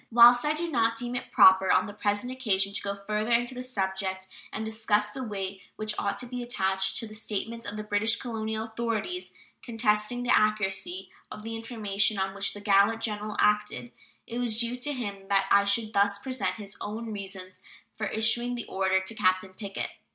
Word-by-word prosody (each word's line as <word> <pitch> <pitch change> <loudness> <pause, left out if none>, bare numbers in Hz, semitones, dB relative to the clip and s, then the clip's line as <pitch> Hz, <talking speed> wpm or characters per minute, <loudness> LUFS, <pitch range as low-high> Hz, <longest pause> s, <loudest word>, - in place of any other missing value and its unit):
Whilst 240 +1 +8
I 300 - +2
do 340 +2 -2
not 230 -7 +1
deem 240 +1 -2
it 250 0 -5
proper 190 -5 +7
on - - +4
the 205 - -7
present 205 +3 -1
occasion 200 -6 +1
to - - -1
go 200 0 -3
further 215 +2 -1
into 240 +2 +2
the 250 - -5
subject 190 -5 -2 0.2
and 220 - -4
discuss 215 -1 0
the 260 +4 -5
weight 195 -4 -4
which 215 0 0
ought 200 - -1
to 250 - -4
be 245 0 -5
attached 190 -5 0
to 225 - -4
the 215 - -11
statements 220 +1 -3
of 205 +1 -5
the 215 - -4
British 210 +2 +1
colonial 220 -2 -3
authorities 230 - -3 0.3
contesting 225 0 0
the 245 - +4
accuracy 190 -3 0 0.2
of 210 - -9
the 225 +1 -5
information 215 -3 0
on 190 0 -1
which 200 +1 -1
the 205 - -8
gallant 205 +2 +4
General 210 -1 -3
acted, 210 +3 +1 0.3
it 235 - -5
was 230 -3 -1
due 235 +1 0
to 255 +4 -1
him 200 -7 -5
that 195 -1 +3
I 200 0 +6
should 215 +2 +1
thus 200 0 +3
present 255 +5 -2
his 205 -2 -9
own 220 +2 -5
reasons 190 -2 -8 0.4
for 215 - -2
issuing 240 +3 +1
the 240 - -4
order 190 0 +1
to 190 +4 -4
Captain 185 -2 +1
Pickett. 200 0 -5
215 Hz, 195 wpm, -28 LUFS, 200-235 Hz, 0.4 s, Whilst